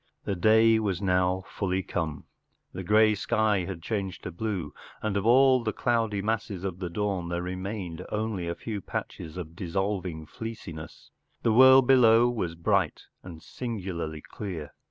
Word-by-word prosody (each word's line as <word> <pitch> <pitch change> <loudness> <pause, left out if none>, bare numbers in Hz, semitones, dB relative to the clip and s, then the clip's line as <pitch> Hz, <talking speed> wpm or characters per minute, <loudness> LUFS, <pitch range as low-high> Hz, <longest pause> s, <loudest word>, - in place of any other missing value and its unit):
The - - -2
day 110 +4 +5
was 100 -5 -1
now 90 -1 +1
fully 95 -1 -2
come. 80 -5 -3 0.5
The 95 - -5
grey 110 +3 +5
sky 105 -2 +1
had 85 -3 -7
changed 100 -2 -3
to 90 - -5
blue, 90 -3 -4 0.3
and 105 -2 -1
of 100 +2 0
all 130 +1 +5
the 110 - 0
cloudy 115 -5 0
masses 105 -4 -2
of 95 -2 -4
the 90 -2 -4
dawn 95 -1 -2
there 85 0 -2
remained 90 -1 -5
only 105 -5 -2
a 85 - -2
few 105 -3 -5
patches 80 -1 -6
of 85 -2 -7
dissolving 95 -3 -3
fleeci¬ 110 -1 -7
ness* 80 0 -11 0.3
The 115 - +3
world 130 +1 +8
Mow 120 -2 +6
was 90 -8 -3
bright 90 -1 0 0.2
and 85 -3 -11
singularly 90 -9 -5
clear. 85 -7 -7
95 Hz, 160 wpm, -27 LUFS, 85-110 Hz, 0.5 s, world